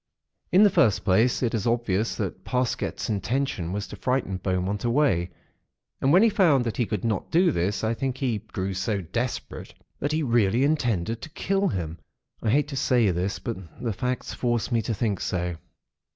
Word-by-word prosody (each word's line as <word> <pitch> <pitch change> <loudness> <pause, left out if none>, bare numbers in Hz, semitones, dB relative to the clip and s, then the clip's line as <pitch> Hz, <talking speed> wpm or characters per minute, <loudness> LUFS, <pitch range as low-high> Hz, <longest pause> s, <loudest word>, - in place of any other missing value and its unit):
"In 185 +5 +6
the 205 - +6
first 105 - +3
place, 110 +7 +3
it 120 - 0
is 115 -1 -1
obvious 115 -3 0
that 95 -2 -4
Parsket's 125 -1 -1
intention 110 -3 -1
was 100 +2 -3
to - - -9
frighten 125 -7 -1
Beaumont 95 +2 -2
away; 120 - +2 0.7
and 135 - +3
when 185 +6 +6
he - - +7
found 165 - +4
that 115 - -3
he 120 - +1
could 105 -1 -3
not 110 -4 -1
do 175 +1 +4
this, 100 0 -1
I 110 +1 +1
think 130 +1 -2
he 125 -6 -1
grew 95 0 -4
so 95 +2 -1
desperate 120 +9 -4 0.2
that 145 - -1
he 155 +1 0
really 120 -1 +2
intended 115 - 0
to - - -7
kill 195 +5 0
him. 85 -4 -3 0.4
I 115 - 0
hate 145 +6 +2
to 140 - -5
say 125 -6 +3
this; 90 +4 -1
but 115 -5 -4 0.2
the 115 -3 -2
facts 125 +4 -3
force 120 0 -1
me 115 -1 +2
to 115 - -2
think 105 -1 -1
so. 90 -2 -2
115 Hz, 190 wpm, -26 LUFS, 95-130 Hz, 0.7 s, he